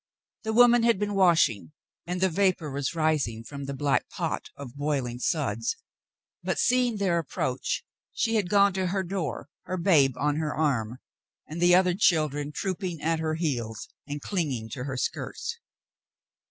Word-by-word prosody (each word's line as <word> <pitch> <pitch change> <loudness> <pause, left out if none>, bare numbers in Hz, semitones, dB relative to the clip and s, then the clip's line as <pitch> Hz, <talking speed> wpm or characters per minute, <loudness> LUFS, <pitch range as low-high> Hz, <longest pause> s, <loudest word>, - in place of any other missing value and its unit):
The 220 - -2
woman 240 +1 +6
had 235 -2 +3
been 205 +1 -2
washing, 165 - +3 0.3
and 180 +1 -2
the 190 - +4
vapor 180 -4 +1
was 140 +3 -2
rising 150 -8 0
from 140 +3 -7
the 140 - -4
black 140 0 0
pot - - -3
of 135 -2 -9
boiling 140 -4 -2
suds, 460 - -1 0.7
but, - - -2
seeing 245 -3 +2
their 185 -4 +1
ap 160 - -7
proach, 125 0 -2 0.3
she 225 - 0
had 205 -5 +1
gone 200 0 +4
to 190 0 -1
her 190 +1 -1
door, 170 -8 -4 0.2
her 185 - -3
babe 150 -8 +4
on 150 +1 0
her 155 -2 -2
arm 125 -7 0 0.5
and 165 +3 -7
the 175 0 +6
other 180 -1 +4
children 155 -6 +1
trooping 185 0 -3
at 160 +2 0
her 155 -1 -1
heels 120 - -3 0.2
and 145 0 -5
clinging 140 - -2
to 125 +3 -5
her 135 -2 -4
skirts. 465 - -4
160 Hz, 165 wpm, -27 LUFS, 140-190 Hz, 0.7 s, woman